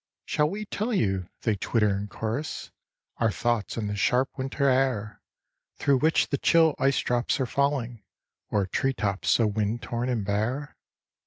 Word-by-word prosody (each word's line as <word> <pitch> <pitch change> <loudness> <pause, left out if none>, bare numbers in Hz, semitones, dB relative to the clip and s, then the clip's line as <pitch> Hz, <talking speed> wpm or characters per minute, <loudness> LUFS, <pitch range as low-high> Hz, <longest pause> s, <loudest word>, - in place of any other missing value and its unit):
"Shall 150 0 +1
we 210 +4 -4
tell 215 +3 -2
you," 95 - 0
they 110 -3 +2
twitter 105 0 +1
in 100 +1 -4
chorus, 115 +8 -4 0.5
"Our 115 - +2
thoughts 120 0 -1
in 110 - -2
this 105 0 -3
sharp 125 +5 +2
winter 135 +1 -1
air, 130 -5 +1 0.5
Through 140 -2 +2
which 160 +3 +2
the 140 - -1
chill 165 -2 +4
ice 135 0 +3
drops 120 +2 0
are 130 - +1
falling 125 -4 -1 0.5
O'er 100 -2 +2
treetops 100 -2 -1
so 115 - +4
wind 105 +2 -1
torn 120 +1 -2
and 115 -5 -1
bare? 115 +8 -2
120 Hz, 160 wpm, -27 LUFS, 105-140 Hz, 0.5 s, chill